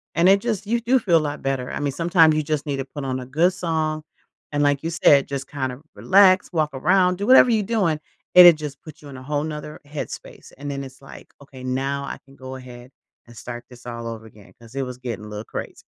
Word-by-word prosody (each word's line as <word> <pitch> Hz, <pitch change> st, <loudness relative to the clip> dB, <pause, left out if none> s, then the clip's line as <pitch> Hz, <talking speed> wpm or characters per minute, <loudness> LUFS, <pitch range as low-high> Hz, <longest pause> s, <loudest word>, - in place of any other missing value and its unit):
And 175 Hz, +2 st, +4 dB
it 195 Hz, +1 st, +6 dB
just 215 Hz, -2 st, -3 dB
you 235 Hz, +2 st, +1 dB
do 250 Hz, +3 st, +3 dB
feel 175 Hz, -7 st, +3 dB
lot 150 Hz, -1 st, -4 dB
better, 135 Hz, -2 st, -2 dB
I -, -, -4 dB
mean, 145 Hz, -1 st, -1 dB
sometimes 165 Hz, 0 st, +4 dB
you 155 Hz, -, 0 dB
just 150 Hz, -1 st, -2 dB
need 145 Hz, -2 st, -2 dB
to 135 Hz, -, -3 dB
put 140 Hz, +1 st, -8 dB
on 130 Hz, -1 st, -2 dB
a 125 Hz, -, -7 dB
good 160 Hz, +8 st, +2 dB
song 160 Hz, -3 st, -2 dB, 0.5 s
and 145 Hz, 0 st, 0 dB
like 145 Hz, -1 st, +2 dB
you 165 Hz, -, -2 dB
said, 145 Hz, -4 st, +4 dB
just 140 Hz, -1 st, -4 dB
kind 130 Hz, -3 st, -3 dB
of 125 Hz, +4 st, -11 dB
relax, 190 Hz, -1 st, +4 dB
walk 155 Hz, -2 st, +1 dB
around, 180 Hz, +6 st, +2 dB
do 205 Hz, -, -2 dB
whatever 255 Hz, -1 st, +7 dB
you're 220 Hz, -2 st, +2 dB
doing, 190 Hz, -8 st, 0 dB, 0.4 s
and 180 Hz, -1 st, +11 dB
it 170 Hz, -, +8 dB
just 150 Hz, -3 st, -7 dB
puts 155 Hz, -1 st, -12 dB
you 145 Hz, -, -12 dB
in 135 Hz, -, -10 dB
a -, -, -10 dB
whole 145 Hz, +1 st, -1 dB
another 150 Hz, 0 st, -6 dB
headspace, 145 Hz, 0 st, -8 dB
and 145 Hz, +1 st, -5 dB
then 140 Hz, 0 st, -4 dB
it's, 135 Hz, 0 st, -12 dB
like, -, -, -13 dB
"Okay 135 Hz, -2 st, -13 dB
now 135 Hz, +2 st, -2 dB
I -, -, -6 dB
can 135 Hz, 0 st, -19 dB
go 130 Hz, -1 st, -9 dB
ahead 125 Hz, -1 st, -11 dB, 0.4 s
and 120 Hz, -1 st, -15 dB
start 120 Hz, 0 st, -7 dB
this 125 Hz, -1 st, -15 dB
all 115 Hz, -1 st, -6 dB
over 115 Hz, -1 st, -7 dB
again 105 Hz, -2 st, -17 dB
'cause 115 Hz, 0 st, -16 dB
it 135 Hz, -, -1 dB
was 125 Hz, -1 st, -7 dB
getting 115 Hz, -4 st, -6 dB
little 105 Hz, 0 st, -6 dB
crazy." -, -, -7 dB
145 Hz, 250 wpm, -22 LUFS, 130-165 Hz, 0.5 s, and